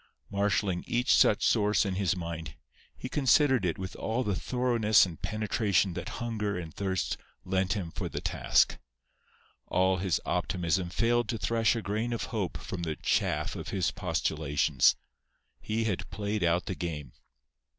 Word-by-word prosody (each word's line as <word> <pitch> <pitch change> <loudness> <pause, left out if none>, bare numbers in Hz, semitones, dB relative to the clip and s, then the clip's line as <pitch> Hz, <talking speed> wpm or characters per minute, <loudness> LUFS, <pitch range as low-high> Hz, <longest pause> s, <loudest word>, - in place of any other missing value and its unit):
Marshalling 100 -2 0
each 120 +1 +2
such 105 - +4
source 105 -1 +3
in 95 - -1
his 95 -1 +1
mind, 85 -4 -6 0.4
he - - -5
considered 130 -3 +3
it 85 -3 0
with 95 0 -6
all 115 +3 -1
the 105 -4 0
thoroughness 115 -1 +3
and 85 -4 -9
penetration 105 -3 +1
that 85 0 -5
hunger 105 -4 -2
and 80 -3 -6
thirst 95 -2 -2 0.3
lent 95 0 +1
him 95 -6 -4
for - - -4
the - - -4
task. - - +2 0.9
All 95 0 +2
his 90 -1 0
optimism 90 0 0
failed 115 +5 +1
to 115 - -1
thresh 115 +2 +2
a 115 - -3
grain 110 +5 -1
of 115 - -2
hope 100 -6 -2
from 95 - -6
the 80 -2 -2
chaff - - 0
of - - -6
his 95 -3 0
postulations. 80 -6 +1 0.6
He 110 +1 -2
had 105 -5 -2
played 105 +1 -2
out 85 0 +2
the - - -3
game. 80 -5 -5
95 Hz, 160 wpm, -29 LUFS, 90-110 Hz, 0.9 s, such